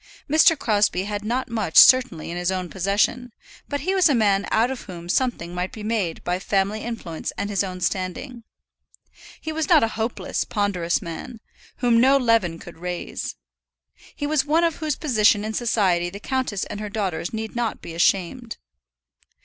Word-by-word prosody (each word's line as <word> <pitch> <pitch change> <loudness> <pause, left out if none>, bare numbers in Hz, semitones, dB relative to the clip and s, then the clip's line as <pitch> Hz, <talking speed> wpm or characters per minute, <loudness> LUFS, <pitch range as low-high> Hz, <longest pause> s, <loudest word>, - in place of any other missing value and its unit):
Mr. 310 +2 +5
Crosbie 205 -6 +1
had 205 0 -4
not 245 +4 -1
much 215 -8 -2
certainly 250 - +6
in - - -5
his 175 +1 -1
own 185 -2 -3
possession, 205 +6 0 0.4
but 285 -1 -2
he 370 +6 0
was 375 -4 +4
a 285 - +3
man 200 -3 +2
out 235 +4 +2
of 265 - -6
whom 175 -3 -9
something 175 -5 -1
might 180 +1 -3
be 215 - -9
made 210 -7 -2
by 180 +1 -1
family 200 +2 0
influence 210 -9 -5
and 205 - -3
his 200 -1 +1
own 185 -1 -5
standing. 190 +8 -3 1.0
He 315 - -5
was 315 +3 -2
not 320 -7 +6
a 225 - +1
hopeless, 225 +2 -2
ponderous 185 -5 -1
man, 175 +8 -7 0.4
whom 235 -2 +4
no 270 +2 +5
leaven 230 -10 +2
could 170 0 -12
raise. 180 0 -5 0.8
He 290 - -4
was 300 -1 +2
one 310 +4 +2
of 335 -2 +1
whose 310 -3 -2
position 215 -7 +2
in 220 - -3
society 190 -7 +1
the 200 +3 -9
countess 255 -4 -2
and 205 - -7
her 210 0 -5
daughters 190 -5 -3
need 220 0 -5
not 235 -2 -2
be 165 - -7
ashamed. 195 +7 0
215 Hz, 180 wpm, -23 LUFS, 185-250 Hz, 1.0 s, certainly